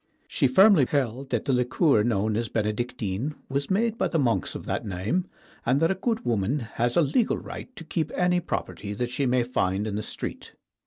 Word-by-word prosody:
She - - +2
firmly 185 - +6
held 135 -1 -1
that 120 -3 -1
the 140 - +1
liqueur 125 +1 +3
known 110 -2 +1
as 115 0 -1
Benedictine 110 +3 -2
was 140 +1 -1
made 225 +4 +1
by - - +2
the 165 - -1
monks 125 -6 0
of - - -6
that - - -2
name, 105 - -2 0.4
and 130 +4 +2
that 165 +3 +3
a - - +3
good 225 +4 -2
woman 120 +4 0
has 120 +1 0
a - - +6
legal 215 - +1
right - - -8
to - - -9
keep 160 -1 -2
any 180 0 +2
property 105 - -4
that 120 +3 -2
she 135 +1 0
may 125 0 +3
find 100 -5 0
in 110 - -3
the 105 - -2
street. - - -6
125 Hz, 205 wpm, -26 LUFS, 110-165 Hz, 0.4 s, firmly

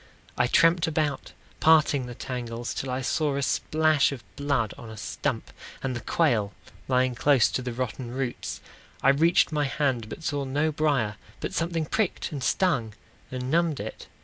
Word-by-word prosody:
I 125 - +2
tramped 165 +6 +4
about, 150 -3 -1 0.3
parting 150 -5 +4
the 120 - -7
tangles, 120 -2 -4
Till 135 - -4
I 130 +1 -1
saw 145 +2 0
a 140 - -1
splash 155 +1 +2
of 130 -4 -7
blood 140 -7 0
on 115 - -10
a 110 - -9
stump, - - -3 0.3
And 130 -2 -1
the - - -3
quail 110 -8 +1 0.3
lying 130 -1 +2
close 135 0 +4
to - - -1
the 125 -1 -4
rotten 125 0 -4
roots. 125 0 -4 0.4
I 135 - +6
reached 160 +6 +4
my 150 -1 +1
hand, 130 -4 0
but 160 - -8
saw 145 -2 -1
no 145 +4 0
brier, 140 -9 +1 0.2
But - - -4
something 165 -1 -1
pricked 210 +4 -1
and 140 -4 -4
stung 125 - +1 0.3
and 130 0 -4
numbed 165 -2 +2
it. - - -7
135 Hz, 175 wpm, -26 LUFS, 125-155 Hz, 0.4 s, I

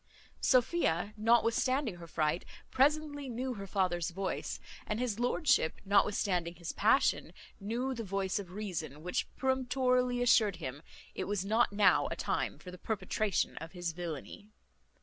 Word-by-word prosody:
Sophia, 230 - +2
notwithstanding 230 +1 +2
her 170 -1 -10
fright, 155 +1 0 0.3
presently 290 0 +1
knew 250 +2 -3
her 200 -3 -7
father's 180 -3 0
voice; 190 +2 -3 0.3
and 215 +1 -2
his 240 -4 -1
lordship, 250 - +2
notwithstanding 195 -3 +2
his 170 -1 -5
passion, 225 +7 +2 0.3
knew 235 +6 -2
the 230 -2 -5
voice 195 0 -1
of 195 -3 -7
reason, 170 -7 -5
which 180 +1 -1
peremptorily 255 -1 +1
assured 220 -5 +4
him, 145 -4 -6 0.3
it 185 - -3
was 200 -2 -2
not 220 +3 +3
now 200 -2 +4
a - - -3
time - - -2
for 180 - -10
the 180 - -11
perpetration 215 0 -1
of 165 +2 -8
his 175 -2 -3
villany. 170 +3 -7
205 Hz, 145 wpm, -32 LUFS, 180-245 Hz, 0.3 s, assured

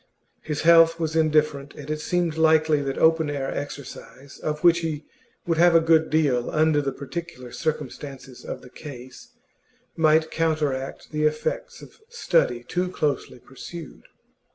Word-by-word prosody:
His 150 -1 -4
health 165 0 +6
was 160 -1 -2
indifferent, 150 -3 +1
and 145 - -10
it 155 0 -3
seemed 175 -2 -1
likely 160 -2 +3
that 135 -1 -3
open 160 -1 +3
air 140 -2 -3
exercise, 140 -1 -8
of 150 +1 -4
which 170 -1 +6
he 155 -3 -4 0.4
would 165 -2 0
have 175 0 +5
a - - +8
good 160 -1 +3
deal 140 -6 +1
under 155 -1 +2
the 140 -1 -2
particular 135 -2 -7
circumstances 140 -4 -5
of - - -7
the 125 - -14
case, 130 - -11 0.7
might 160 -1 +3
counteract 150 -5 -2
the 155 0 0
effects 485 - -2
of - - -15
study 165 - +1
too 180 +7 -2
closely 150 -9 -2
pursued. 140 +5 -11
155 Hz, 150 wpm, -24 LUFS, 140-165 Hz, 0.7 s, a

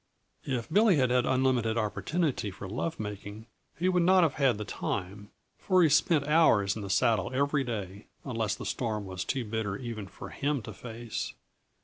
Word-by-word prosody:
If 125 -4 -2
Billy 205 +3 +4
had 130 -4 +2
had 125 0 +2
unlimited 130 -3 +2
opportunity 130 - -1
for 95 +1 -8
lovemaking, 105 - -5 0.3
he 180 - 0
would 180 -1 +3
not 185 +1 +5
have 160 - +2
had 135 -6 +2
the 105 - -5
time, 100 +1 -4 0.3
for 185 -2 +3
he 160 - +5
spent 145 0 +3
hours 115 -11 +4
in 110 - -5
the 100 - -6
saddle 105 0 +2
every 140 +1 +1
day, 105 -4 -5 0.2
unless 115 -5 -1
the - - -8
storm 110 -4 -2
was 95 -1 -4
too 130 -3 -2
bitter 105 -2 -2
for - - -15
even 115 -5 -6 0.3
him 140 -3 0
to 110 - -8
face. 115 +2 -6
120 Hz, 175 wpm, -29 LUFS, 105-145 Hz, 0.3 s, not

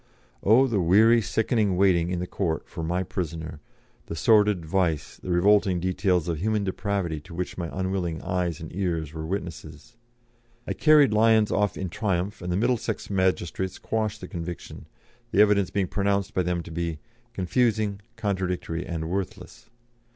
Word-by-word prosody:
Oh, 115 +6 +5
the 115 -6 0
weary, 110 +7 +5
sickening 105 -2 +1
waiting 90 -3 +3
in 90 - -1
the 90 - -2
court 85 -4 -2
for - - -7
"my 90 +3 0
prisoner," 80 -4 -5 0.5
the 80 - -5
sordid 105 +1 +3
vice, 80 -4 -1
the - - -9
revolting 95 +1 +3
details 90 -1 0
of 85 -3 -2
human 105 +2 0
depravity 95 -4 -2
to 80 +3 -12
which 90 +1 -4
my 85 -2 -4
unwilling 95 -3 -2
eyes 90 -3 -1
and 80 0 -9
ears 85 -6 -2
were 80 0 -5
witnesses. 85 - -6 0.7
I - - -2
carried 150 -7 +5
Lyons 110 -1 +4
off 105 -2 +1
in 95 -1 -3
triumph, 95 +1 -2
and 90 0 -3
the 90 - +1
Middlesex 120 -1 -1
magistrates 95 -1 0
quashed 110 -2 -2
the 90 - -7
conviction, 85 0 -7 0.4
the 100 - 0
evidence 100 -3 +2
being 100 -2 0
pronounced 100 0 0
by 95 - +1
them 90 -1 -1
to 85 - -10
be 85 -1 -3 0.4
"confusing, 105 +1 0
contradictory, 90 -6 -2
and 80 -2 -3
worthless." 95 +5 -5
95 Hz, 160 wpm, -26 LUFS, 85-105 Hz, 0.7 s, Oh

